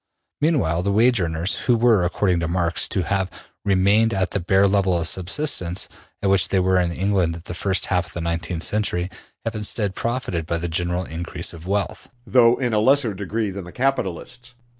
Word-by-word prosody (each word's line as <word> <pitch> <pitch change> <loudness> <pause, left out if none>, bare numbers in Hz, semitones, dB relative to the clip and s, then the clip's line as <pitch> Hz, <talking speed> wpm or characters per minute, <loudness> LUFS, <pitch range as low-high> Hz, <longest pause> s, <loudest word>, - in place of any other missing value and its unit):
Meanwhile 105 - +2
the 100 +2 0
wage 115 +1 +4
earners, 85 +3 0
who 120 -2 +4
were, 115 -5 +4
according 90 0 +1
to 85 - -1
Marx, 85 0 0
to 95 - -1
have 95 +1 -1 0.3
remained 100 +3 +3
at 95 0 0
the 100 - -1
bare 95 +3 +3
level 95 -2 +2
of 85 -1 0
subsistence 95 - 0 0.4
at 100 - +2
which 95 -3 +3
they 95 - +2
were 95 0 +3
in 90 - 0
the 85 - -5
England 95 -3 +1
of 85 - -10
the 85 - -6
first 95 +3 0
half 90 -1 0
of 80 - -13
the 85 - -4
nineteenth 85 0 -2
century, 95 -4 -1 0.3
have 115 - -2
instead 105 -2 -1
profited 115 -9 -3
by 85 - 0
the 85 +1 -2
general 90 +2 -1
increase 85 0 -3
of 85 +1 -11
wealth, 100 +1 -2 0.2
though 115 +2 +5
in 125 -3 -2
a 105 - +3
lesser 130 0 +3
degree 105 +2 -3
than 95 0 -6
the 90 - -10
capitalists. 125 0 -3
95 Hz, 205 wpm, -22 LUFS, 85-110 Hz, 0.4 s, though